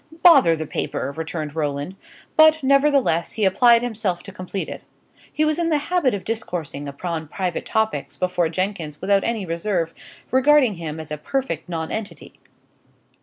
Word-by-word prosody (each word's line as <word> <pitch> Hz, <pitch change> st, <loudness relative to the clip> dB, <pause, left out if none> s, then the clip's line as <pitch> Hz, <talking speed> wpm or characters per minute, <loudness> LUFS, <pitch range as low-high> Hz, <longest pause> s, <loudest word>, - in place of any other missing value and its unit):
"Bother 275 Hz, -, +7 dB
the 160 Hz, 0 st, -4 dB
paper!" 140 Hz, -, -3 dB
returned 160 Hz, -2 st, -5 dB
Roland; 145 Hz, +3 st, -2 dB, 0.4 s
but, 315 Hz, -1 st, +6 dB
nevertheless, 275 Hz, -, +3 dB
he 215 Hz, -3 st, 0 dB
applied 235 Hz, +5 st, +5 dB
himself 215 Hz, -7 st, -2 dB
to 195 Hz, -, -10 dB
complete 185 Hz, +1 st, -5 dB
it. -, -, -7 dB, 0.5 s
He 310 Hz, -, +1 dB
was 310 Hz, +2 st, +1 dB
in 335 Hz, -1 st, +1 dB
the 310 Hz, -, +3 dB
habit 295 Hz, -, +1 dB
of 195 Hz, -, -7 dB
discoursing 170 Hz, -10 st, -4 dB
upon 160 Hz, +3 st, -4 dB
private 180 Hz, +2 st, -3 dB
topics 220 Hz, -10 st, -1 dB
before 180 Hz, -2 st, 0 dB
Jenkins 170 Hz, -4 st, -3 dB
without 195 Hz, +1 st, +2 dB
any 225 Hz, -4 st, -2 dB
reserve, 170 Hz, 0 st, -1 dB, 0.4 s
regarding 260 Hz, -2 st, +4 dB
him 160 Hz, -2 st, -5 dB
as 155 Hz, -1 st, -8 dB
a 150 Hz, -, -4 dB
perfect 175 Hz, -, -3 dB
nonentity. 175 Hz, +6 st, -5 dB
190 Hz, 155 wpm, -22 LUFS, 160-250 Hz, 0.5 s, Bother